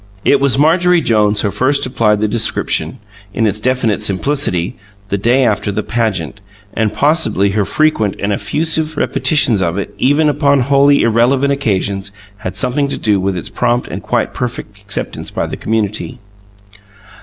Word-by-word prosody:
It 140 - +4
was 135 -1 +2
Marjorie 175 +4 +3
Jones 105 -3 +2
who 100 - -1
first 140 +5 +1
applied 105 -5 +1
the 110 - +2
description, 110 +1 0 0.4
in 115 - +1
its 105 0 -1
definite 125 -3 0
simplicity, 95 - 0 0.3
the 100 - 0
day 125 +5 +2
after 105 -2 0
the 105 +2 -3
"pageant," 105 -5 -2 0.3
and, 110 -2 0
possibly, 145 - +1
her 105 0 0
frequent 110 -10 +1
and 100 +1 -2
effusive 160 +6 -1
repetitions 130 - +2
of 85 0 -1
it, 100 - -4
even 145 +4 +2
upon 140 -1 +2
wholly 140 +2 +3
irrelevant 125 +5 +2
occasions, 100 -6 -2 0.3
had 105 - -6
something 140 +2 0
to - - -2
do 105 -4 +1
with 95 -1 -1
its 85 - -6
prompt 120 0 -1
and - - -6
quite - - -1
perfect 115 -4 -5
acceptance 100 -1 -4
by - - -3
the - - -5
community. 110 +3 -2
115 Hz, 160 wpm, -15 LUFS, 105-140 Hz, 0.4 s, It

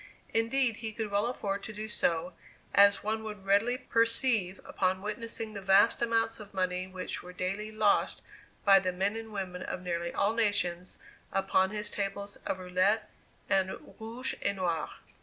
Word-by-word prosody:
Indeed, 230 +1 +2
he 220 -1 -5
could 215 -1 -4
well 205 +3 +2
afford 200 -5 -2
to 220 - -7
do 215 +1 -5
so, 175 -3 0 0.4
as 200 0 +6
one 220 +1 -1
would 210 -3 -7
readily 210 +6 +3
perceive 230 -5 +1
upon 190 0 0
witnessing 225 +1 -4
the 200 - -6
vast 195 +4 +5
amounts 225 -1 +1
of 205 -2 -11
money 185 0 0
which 185 0 -5
were 180 - -10
daily 195 +4 -3
lost 215 -2 +2 0.4
by 195 -1 +8
the 185 -1 -1
men 195 +4 0
and 225 -1 -6
women 185 -3 -4
of 180 - -5
nearly 170 -1 -2
all 210 - +1
nations, 205 -6 0 0.3
upon 190 -1 +2
his 210 0 -2
tables 200 0 -3
of - - -3
roulette 185 +4 +1 0.4
and 190 -1 +1 0.2
rouge 235 +4 -1
et 200 - +1
noir. 170 -5 -1
200 Hz, 165 wpm, -30 LUFS, 185-220 Hz, 0.4 s, by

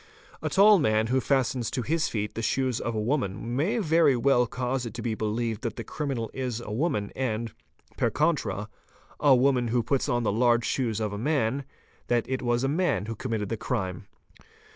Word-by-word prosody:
'A - - -1
tall 205 +1 +6
man 110 -6 +2
who 130 - +3
fastens 130 -3 0
to 125 - -2
his 160 +4 0
feet 105 -2 -3
the 115 - -4
shoes 130 +1 0
of 115 - -3
a - - 0
woman 115 -2 -1
may 175 - +1
very 160 - +4
well 125 0 +3
cause 125 +1 -2
it 115 -3 -6
to - - -5
be 115 -2 -1
believed 110 0 -2
that 115 -3 -3
the 115 - -5
criminal 130 -3 -3
is 125 -3 -3
a 110 -3 -7
woman 105 -4 -1
and, 115 -3 -2 0.4
per - - +2
contra, - - 0 0.5
a 140 -3 +6
woman 125 -1 +3
who 120 +1 +1
puts 135 +3 0
on 120 0 +1
the 110 - +1
large 120 +1 +3
shoes 115 -5 -1
of 105 -2 -2
a 100 - -4
man, 140 0 0 0.4
that 120 -1 +1
it 130 0 -2
was 120 0 0
a - - +2
man 150 - 0
who 115 +1 -5
"committed 110 -4 -3
the 115 - -2
crime. 95 -3 -3
120 Hz, 205 wpm, -27 LUFS, 110-135 Hz, 0.5 s, tall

